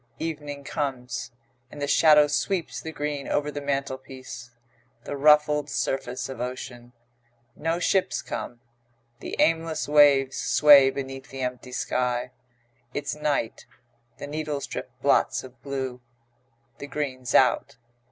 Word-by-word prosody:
Evening 145 -3 -5
comes, 130 -5 -4 0.4
and 145 - -11
the 145 - -1
shadow 150 0 +6
sweeps 145 - -1
the 160 - -6
green 145 -2 -4
over 150 0 0
the 145 - -5
mantelpiece; 130 -3 -5 0.5
the - - -5
ruffled 150 0 +4
surface 130 -2 -2
of 130 -3 -7
ocean. 125 -1 -6 0.6
No 165 +2 -1
ships 175 -8 +1
come; 120 -1 -6 0.6
the - - -6
aimless 165 -1 +1
waves 145 -2 +5
sway 145 -3 +7
beneath 135 -1 -6
the 135 0 -7
empty 125 0 -4
sky. 125 0 -1 0.6
It's 145 -1 -2
night; 150 -6 -2 0.5
the - - -6
needles 150 -1 -3
drip - - -6
blots - - +2
of 130 -2 -14
blue. 130 -3 -4 0.8
The 140 - -7
green's 130 -4 -3
out. 125 -2 +3
140 Hz, 125 wpm, -26 LUFS, 130-150 Hz, 0.8 s, sway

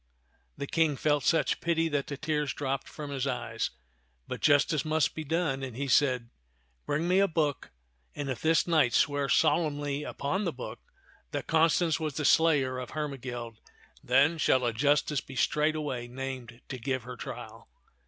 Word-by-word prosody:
The 140 - -3
King 160 0 +1
felt 145 -1 +1
such 165 - +2
pity 165 -1 +1
that 145 -2 -1
the 140 - -5
tears 150 -4 -1
dropped 135 -1 -3
from 150 -2 -7
his 135 -1 -2
eyes; - - -2 0.6
but - - -5
justice 145 +1 +3
must 155 0 +1
be 155 - -5
done, 155 -3 -1
and 130 -3 -6
he 140 +1 -2
said, 130 -4 +2 0.3
" - - -41
Bring 155 +4 0
me 185 +2 +4
a 200 - +4
book, 155 -4 -1 0.5
and 145 - -4
if 130 -4 -3
this 160 0 +3
knight 155 -8 +3
swear 145 -2 +2
solemnly 145 -3 +2
upon 150 +7 -2
the 175 - 0
book 125 - -7 0.5
that - - -4
Constance 165 0 +3
was 155 -3 -3
the 150 - -2
slayer 145 -5 +3
of 125 - -6
Her 150 -1 -2
megild, 120 -4 -6 0.5
then 145 +6 +3
shall 130 -4 +3
a 120 - 0
justice 145 +3 +2
be 135 - -11
straightway 150 -3 0
named 125 -2 -6
to 130 - -5
give 130 0 -2
her 125 +1 -7
trial." - - -9
145 Hz, 175 wpm, -29 LUFS, 130-155 Hz, 0.6 s, me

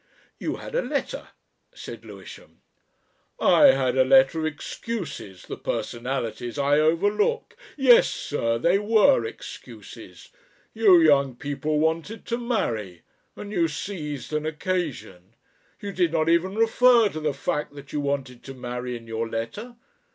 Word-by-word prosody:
"You - - -3
had - - -9
a - - +1
letter," - - -4 0.5
said - - -9
Lewisham. - - -13 0.8
"I 295 - +5
had 130 - +3
a - - +7
letter 135 +4 +4
of 155 - 0
excuses 150 - -6
the - - -7
personalities 120 0 -4
I 145 +1 +3
overlook... 205 - +1 0.2
Yes, 260 -4 +6
sir 115 -5 -2
they 175 +11 +2
were 220 +6 +4
excuses. 435 - -11 0.4
You 205 -6 +6
young 140 -5 +4
people 145 +3 -3
wanted 160 +8 -1
to 235 0 -2
marry 115 - -3 0.3
and 205 - -8
you 170 -5 +1
seized 150 -4 -6
an 155 0 -1
occasion. 155 - -4 0.4
You 200 - -5
did 180 -4 +1
not 160 -1 +1
even 175 +4 +2
refer 230 0 +4
to 155 - -6
the 155 -1 0
fact 145 +1 -3
that 140 -1 -12
you 150 - -1
wanted 135 -3 -3
to 135 - -8
marry 125 0 -5
in 115 - -14
your 115 0 -4
letter. 160 - -5
155 Hz, 145 wpm, -24 LUFS, 130-200 Hz, 0.8 s, a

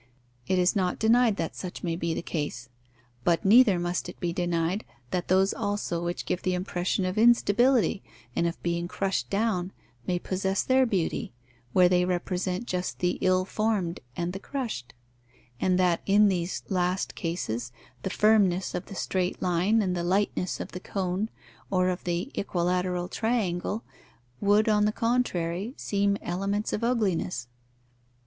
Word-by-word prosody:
It 185 - +2
is 180 +2 +3
not 185 -3 +1
denied 230 0 +4
that - - -3
such 180 -2 -7
may 170 -2 -1
be 165 -1 -2
the - - -3
case. 145 -7 -4 0.5
But 170 +1 +2
neither 215 -1 +7
must 175 0 -2
it - - -10
be 170 -1 -1
denied 175 +2 0 0.3
that 180 -1 -1
those 190 +1 +3
also 205 -5 -2
which 175 0 -3
give 180 - -1
the 185 -1 0
impression 180 +1 -1
of 185 +3 -1
instability 240 0 +4 0.3
and 170 - +2
of 170 - -4
being 170 0 -1
crushed 190 +2 -1
down 200 -3 0 0.4
may 180 - +1
possess 190 +2 -1
their 260 0 +3
beauty, 185 - -1 0.4
where 180 +4 +6
they 180 0 +3
represent 180 +2 -1
just 180 -4 -3
the 180 0 0
ill 185 0 +3
formed 205 -5 -1 0.2
and 175 +1 -2
the 195 - -5
crushed; 205 - -5 0.6
and 185 -1 +2
that 180 -2 +2
in 205 +1 +6
these 180 -1 -2
last 180 0 0
cases 120 - -3 0.3
the - - -2
firmness 200 -3 +3
of 180 - -4
the 195 - -8
straight 185 -1 -1
line 185 +5 +2
and 180 -2 0
the 175 - -2
lightness 185 0 0
of - - -6
the 180 - -6
cone 190 +2 -2 0.4
or 185 -1 +2
of 180 0 -3
the 175 +8 -2
equilateral 180 -1 0
triangle 220 -2 -1 0.6
would, 205 +2 +3
on 210 -1 +4
the 210 - +2
contrary, 220 -3 -1
seem 200 0 +1
elements 195 +4 -1
of 210 - -2
ugliness. 190 - 0
185 Hz, 160 wpm, -27 LUFS, 175-205 Hz, 0.6 s, neither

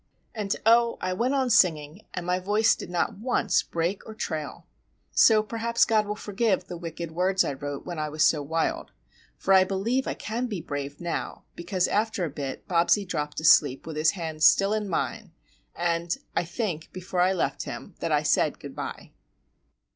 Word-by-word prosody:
And, 210 -3 -2
oh, 235 +1 +4
I 185 0 -2
went 245 +8 0
on 260 -2 +1
singing, 165 -4 +3
and 180 - -4
my 180 +1 +1
voice 210 +4 +3
did - - -7
not 180 +4 -1
once 245 +3 +1
break 170 +4 -2
or 220 - -8
trail! 155 -9 -5 0.5
So 215 -1 +5
perhaps 230 +2 +1
God 215 -2 +2
will 210 - -2
forgive 205 -2 0
the 180 - -8
wicked 170 -1 -6
words 185 +3 +2
I - - -2
wrote 140 +1 -6
when 175 -3 -5
I 155 0 -2
was 155 +1 0
so 150 - +3
wild,—for 160 - -3
I 190 -1 +7
believe 205 +8 -1
I - - -2
can 235 +4 -3
be 205 -6 -4
brave 145 -2 -5
now 175 -1 -4
because 180 +1 -1
after 215 -3 0
a 155 - -5
bit 140 -2 -6
Bobsie 175 +3 +3
dropped 150 -4 -3
asleep 145 -4 +5
with 160 -1 -6
his 155 +1 +3
hand 160 -2 -5
still 195 +5 +5
in 210 -2 -2
mine, 210 +1 -3 0.4
and—I 170 0 -2
think, 175 -3 -4
before 185 0 -3
I 185 +2 +3
left 185 - -2
him, - - -7
that - - -2
I - - +2
said - - +1
"good - - -9
bye." - - -7
180 Hz, 185 wpm, -26 LUFS, 160-215 Hz, 0.5 s, I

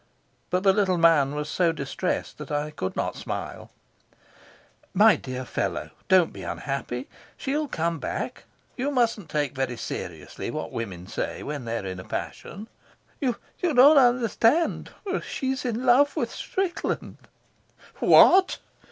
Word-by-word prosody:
But 180 +1 0
the 195 -1 +5
little 190 -3 +2
man 155 -4 +4
was 150 0 -3
so 170 +1 +2
distressed 155 +4 -3
that 150 - -8
I 150 +1 -1
could 95 -10 -4
not - - -2
smile. - - -6 1.3
"My - - +7
dear 130 0 -6
fellow, - - -3 0.2
don't 185 -3 +4
be - - -9
unhappy. 135 -2 -4 0.3
She'll 295 +3 -1
come 165 - -2
back. - - -4 0.3
You 265 +3 -1
mustn't 230 - 0
take 145 -2 -1
very 130 -3 -2
seriously - - -6
what - - -4
women 95 -6 -5
say 95 - -4
when 145 -4 -5
they're 115 -3 -3
in 95 -1 -5
a - - -7
passion." 205 - -6 0.5
"You 250 -4 +1 0.3
don't 330 -8 +2 0.2
understand. 245 +4 +2 0.3
She's 265 +1 -3
in 245 +1 -2
love 265 +4 +5
with - - -1
Strickland." 375 -2 -3 0.8
"What!" 380 0 +6
175 Hz, 135 wpm, -25 LUFS, -, 1.3 s, My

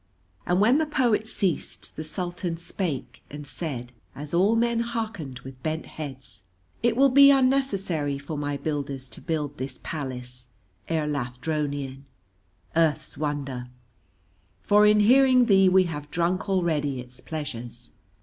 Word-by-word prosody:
And 180 +1 +2
when 240 +8 +5
the 315 - +1
poet 240 -7 +1
ceased 190 -7 -2
the 155 - -5
Sultan 175 +1 -4
spake, 170 -5 -4
and 145 0 -8
said, 135 -5 -5 0.2
as 145 +2 -7
all 195 +6 +4
men 235 0 +2
hearkened 220 - -3
with 130 0 -11
bent 160 +2 -2
heads: 130 -8 -7 0.4
"It 235 -1 +2
will 275 +1 +6
be 280 +1 +8
unnecessary 205 - +2
for 145 +3 -6
my 145 -1 -2
builders 140 -3 -3
to - - -10
build 150 -3 -3
this 130 0 -4
palace, 125 -4 -6 0.4
Erlathdronion, 145 -2 -2 0.7
Earth's 155 -2 +1
Wonder, 140 -4 -3 1.0
for 210 +1 +5
in 210 0 +5
hearing 255 +2 +6
thee 195 -4 +5
we 185 0 +5
have 150 -4 -5
drunk 175 +5 0
already 155 -8 0
its 125 0 -7
pleasures." 120 -6 -6
155 Hz, 135 wpm, -26 LUFS, 140-200 Hz, 1.0 s, be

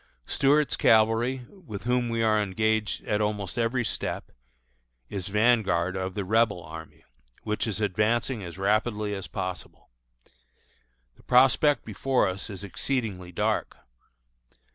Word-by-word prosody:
Stuart's 145 -1 +2
cavalry, 115 +3 +3
with 135 - -10
whom 125 0 +1
we 115 0 0
are 110 -1 +3
engaged 110 +2 0
at 105 0 0
almost 105 -4 -2
every 120 +1 0
step, - - -4 0.8
is 95 -2 -5
vanguard 100 -4 +2
of 95 0 -3
the 100 -2 -2
Rebel 110 -3 +2
army, 80 0 -10 0.4
which 105 +2 -2
is 110 -1 -2
advancing 110 +4 0
as 85 0 -8
rapidly 105 +1 0
as 95 -2 -5
possible. 90 -8 -6 1.3
The - - -21
prospect 135 +4 +4
before 125 +2 +1
us 95 +3 -4
is 100 -1 -7
exceedingly 100 -4 -3
dark. - - -1
105 Hz, 125 wpm, -27 LUFS, 95-120 Hz, 1.3 s, prospect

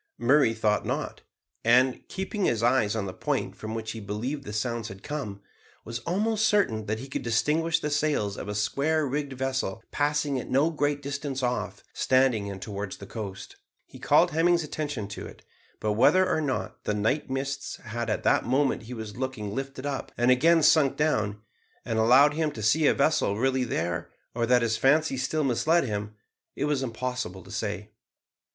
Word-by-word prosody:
Murray 120 -1 +4
thought 105 -2 +1
not, - - -3 0.4
and, 125 +2 +4
keeping 190 +1 -3
his 115 -1 +1
eyes 120 -3 +3
on 110 -3 -1
the 95 - -5
point - - -2
from 110 +1 -6
which 110 -1 -4
he 115 - -6
believed 115 +8 -4
the 105 - -6
sounds 115 +1 -2
had 95 -3 -10
come, 110 -10 -5 0.4
was 115 +1 -4
almost 215 +4 +1
certain 110 - +1
that 110 +1 -1
he 130 +4 -8
could 135 - -4
distinguish 155 +8 +1
the 150 -2 -3
sails 145 -9 0
of - - -7
a 105 - -3
square 145 +9 +1
rigged 140 0 -2
vessel 130 -5 -2
passing 145 -2 0
at - - -7
no 145 +5 +3
great 145 -2 -1
distance 140 -1 -3
off, 125 0 -2
standing 130 -6 +2
in 100 -1 -6
towards 100 -1 -5
the 100 - -9
coast. 100 -2 -7 0.3
He - - -14
called - - +4
Hemming's 170 +2 +3
attention 145 -8 -4
to - - -7
it, - - -14 0.4
but 110 - 0
whether 180 - +5
or 160 - +1
not 140 -4 -3
the 105 - 0
night 110 +8 0
mists 135 +1 -3
had 115 0 -5
at 105 - -1
the - - +4
moment 135 +3 +1
he 125 - -5
was 110 -1 -7
looking 125 -6 -4
lifted 135 +1 -5
up, 140 -2 -3
and 120 +1 +4
again 160 +6 +4
sunk 150 -2 +4
down, 110 -9 0 0.4
and 115 -1 -1
allowed 130 +6 +6
him 155 0 0
to 110 - -6
see 145 +9 +4
a - - +4
vessel 140 -8 +2
really 130 +1 +1
there, 85 -7 -2 0.2
or 115 0 0
that 125 0 +4
his 110 -1 +1
fancy 150 +1 +3
still 150 +4 -1
misled 155 +6 +2
him, 105 -3 -4 0.4
it 140 - -1
was 150 -2 0
impossible 125 -6 -4
to - - -13
say. - - -4
130 Hz, 190 wpm, -27 LUFS, 110-145 Hz, 0.4 s, allowed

